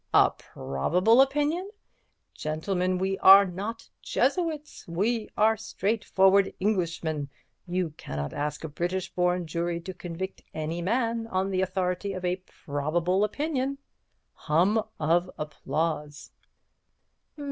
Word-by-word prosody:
A - - +6
probable 180 - +2
opinion? 295 +7 +1 0.6
Gentlemen, 180 +4 -1
we 190 +1 -1
are 195 +1 +9
not 200 +5 -5
Jesuits, 305 +2 -1
we 210 +7 -1
are 220 +1 +4
straightforward 200 -2 +2
Englishmen. 165 -7 -1 0.4
You 175 -2 -1
cannot 70 0 -5
ask 150 +1 -3
a - - -3
British 175 +4 -3
born 180 0 +1
jury 170 +1 -2
to 185 +2 -6
convict 180 +2 -6
any 160 +2 -3
man 230 +3 0
on 190 -2 -1
the 185 0 +1
authority 185 +1 -1
of 185 -1 -5
a 180 +1 +1
probable 170 +2 -1
opinion.' 275 +3 -1 0.6
Hum 180 +8 +2 0.2
of 170 +3 +2
applause." 150 0 -3
185 Hz, 115 wpm, -27 LUFS, 165-215 Hz, 0.6 s, are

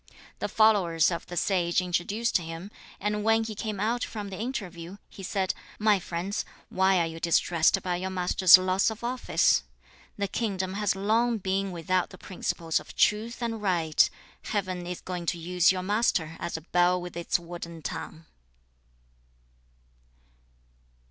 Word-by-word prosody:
The - - -1
followers 190 -7 +3
of 170 - -4
the 175 - -6
sage 175 -2 +2
introduced 185 +5 0
him, 165 +4 -7 0.3
and 210 +1 -1
when 225 +1 +3
he 220 -1 -5
came 210 -1 -4
out 230 +4 0
from 205 -2 -5
the 190 - -6
interview, 195 -7 -5
he - - -11
said, 190 0 -1 0.2
'My 210 -2 +3
friends, 180 +3 -3 0.3
why 190 0 +3
are 170 - +2
you 165 0 -6
distressed 170 -1 +3
by 180 -1 -1
your 185 +1 -3
master's 185 0 +6
loss 185 +2 +2
of 220 +1 -8
office? 250 +1 +2 0.6
The 200 -1 -1
kingdom 190 -3 -2
has 205 -1 0
long 225 +4 +2
been 195 0 -1
without 180 +1 0
the 185 - -12
principles 165 -3 -2
of - - -13
truth 230 +3 +1
and 225 -2 -3
right; 170 -6 +3 0.4
Heaven 185 -4 -2
is 180 0 -5
going 180 -2 -5
to 175 - 0
use 175 +1 +3
your 185 -1 -3
master 190 -6 +1
as 170 - -3
a - - -8
bell 175 +2 +2
with 175 -1 -8
its 170 0 0
wooden 170 -2 -8
tongue.' 160 +1 -6
185 Hz, 155 wpm, -27 LUFS, 175-210 Hz, 0.6 s, master's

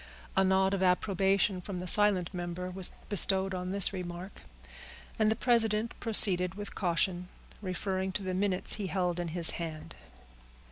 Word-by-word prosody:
A 190 - +3
nod 190 +1 +2
of 195 - -1
approbation 190 +1 +1
from 180 0 -6
the 180 - -6
silent 195 -2 +3
member 180 0 -5
was 185 0 0 0.2
bestowed 190 -1 +3
on 180 0 -4
this 200 0 +5
remark, 180 +1 -7 0.8
and 215 -1 +3
the 220 - +1
president 225 -2 +1
proceeded 185 -5 +2
with 205 0 -7
caution, 180 0 -1 0.3
referring 190 0 -3
to 200 - -4
the 185 -1 -3
minutes 190 0 0
he 195 - -3
held 180 -2 -1
in 175 - -3
his 165 0 +1
hand. 155 - -7
190 Hz, 155 wpm, -30 LUFS, 180-200 Hz, 0.8 s, this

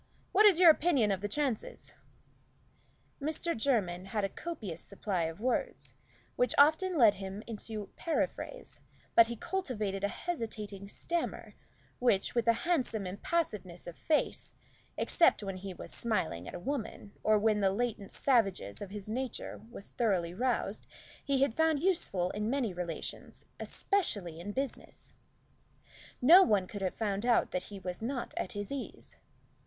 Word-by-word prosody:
What 425 +3 +7
is 385 -5 +5
your 345 -3 +10
opinion 290 -10 +2
of 190 -1 -1
the 205 - -1
chances?" 260 0 -2 1.3
Mr. 315 +3 -1
Jermyn 200 -8 0
had 210 +1 -2
a 195 - 0
copious 210 - -6
supply 195 -4 -2
of 160 +2 -5
words 250 +3 -2 0.4
which 245 -1 +2
often 315 +5 +5
led 225 -6 +7
him 195 +1 -6
into 215 -2 -5
periphrase, 345 +8 -3 0.3
but 230 -1 +7
he 235 - -4
cultivated 215 - -3
a - - +3
hesitating 210 - -5
stammer, 340 +9 -3 0.5
which, 225 -6 +2
with 235 -1 0
a 230 - +7
handsome 255 - +1
impassiveness 195 - -2
of 175 - -7
face, 310 -2 0 0.4
except 335 -10 +3
when 195 -2 -4
he 190 +1 -6
was 180 - -8
smiling 185 - -1
at - - -7
a - - -5
woman, 225 -3 -4
or 215 0 +4
when 210 0 +2
the 195 -1 +3
latent 205 -1 -2
savageness 195 - +1
of 200 - -5
his 205 0 -7
nature 250 +1 -4
was 215 -4 -10
thoroughly 185 -7 0
roused, 230 -1 -1 0.4
he 275 -2 +2
had 275 - +1
found 320 +1 +2
useful 285 - 0
in 210 +1 -2
many 245 -6 0
relations, 175 -2 -6
especially 200 - -1
in 195 +4 -5
business. 270 +5 -5 1.1
No 340 +9 +10
one 205 - +3
could 200 +2 -7
have 185 -1 -1
found 205 -2 -1
out 240 -1 +3
that 180 0 -2
he 205 - -7
was 180 0 -6
not 245 +2 -3
at - - -3
his 205 +2 -5
ease. 280 -2 -6
215 Hz, 155 wpm, -32 LUFS, 195-275 Hz, 1.3 s, your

